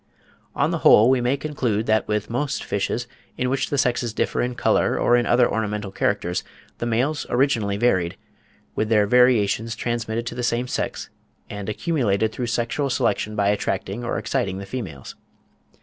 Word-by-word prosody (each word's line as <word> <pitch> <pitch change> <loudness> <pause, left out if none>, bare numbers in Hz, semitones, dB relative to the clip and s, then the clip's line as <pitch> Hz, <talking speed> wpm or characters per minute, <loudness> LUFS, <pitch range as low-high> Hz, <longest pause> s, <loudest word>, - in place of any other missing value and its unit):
On - - +1
the - - -1
whole 115 +4 +6
we 130 -2 +2
may 125 +3 +1
conclude, 125 -8 -1
that 110 -1 +1
with 105 -1 -1
most 130 +5 -2
fishes, 100 +4 -2 0.3
in 125 0 0
which 135 - -1
the 145 - -1
sexes 125 -4 0
differ - - 0
in 125 0 -2
colour - - +2
or 120 - +3
in 120 -1 +2
other 120 0 +4
ornamental 105 -2 -2
characters, 95 -3 -1 0.4
the 120 - -2
males 130 +7 0
originally 120 -6 +1
varied, 95 -7 +1 0.6
with 110 - -1
their 105 -2 +4
variations 115 -1 +3
transmitted 115 0 -2
to 120 - -4
the 125 - -4
same 120 +1 0
sex, - - -4 0.4
and 105 0 -5
accumulated 110 - 0
through 120 +2 -4
sexual 120 +4 -1
selection 105 -3 0
by 100 -1 +2
attracting 100 +2 -2
or 120 - -2
exciting 100 -9 -1
the 100 - -6
females. 95 - -7
115 Hz, 170 wpm, -23 LUFS, 105-125 Hz, 0.6 s, whole